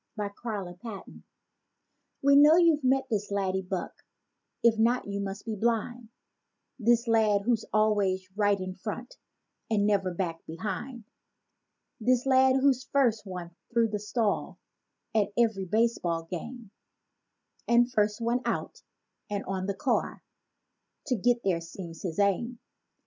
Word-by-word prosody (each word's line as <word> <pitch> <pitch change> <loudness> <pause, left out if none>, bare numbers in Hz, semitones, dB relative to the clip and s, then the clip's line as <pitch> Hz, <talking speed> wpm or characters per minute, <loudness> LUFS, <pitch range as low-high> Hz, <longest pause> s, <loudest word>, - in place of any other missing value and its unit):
HE'S 205 -1 -3
ALWAYS 195 -6 -4
FIRST 220 -5 -8 1.1
We 280 0 +6
know 295 +3 +8
you've 335 -4 +4
met 265 +1 +2
this 210 -1 -1
laddy 190 -1 -1
buck, 185 -1 -4 0.7
if 230 -2 +4
not 240 +3 +2
you 200 0 -4
must 200 +1 -5
be 220 -2 -3
blind; 230 +2 -1 0.7
This 235 +1 +3
lad 215 -3 +3
who's 230 0 +1
always 205 -3 +1
right 205 -1 +2
in 185 0 -4
front 215 +6 -7 0.5
and 205 -2 +2
never 195 -3 +1
back 170 -2 -3
behind; 210 +8 -5 1.0
This 250 +2 +2
lad 260 0 +5
who's 265 -1 +3
first 230 -7 +1
one 180 -2 -6 0.2
through 230 -1 +2
the 210 -1 -3
stile 210 +1 -1 0.6
at 210 -2 +2
every 220 -5 +2
baseball 190 -5 0
game 200 +6 -7 1.0
And 240 +1 +4
first 210 -1 +1
one 235 +2 0
out - - -3 0.5
and 205 -1 -3
on 190 0 -3
the 200 - -2
car—to 255 +3 -5
get 240 +3 +1
there 180 -4 +1
seems 165 0 -9
his 170 -4 -4
aim. 205 +5 +1
215 Hz, 135 wpm, -28 LUFS, 195-240 Hz, 1.1 s, know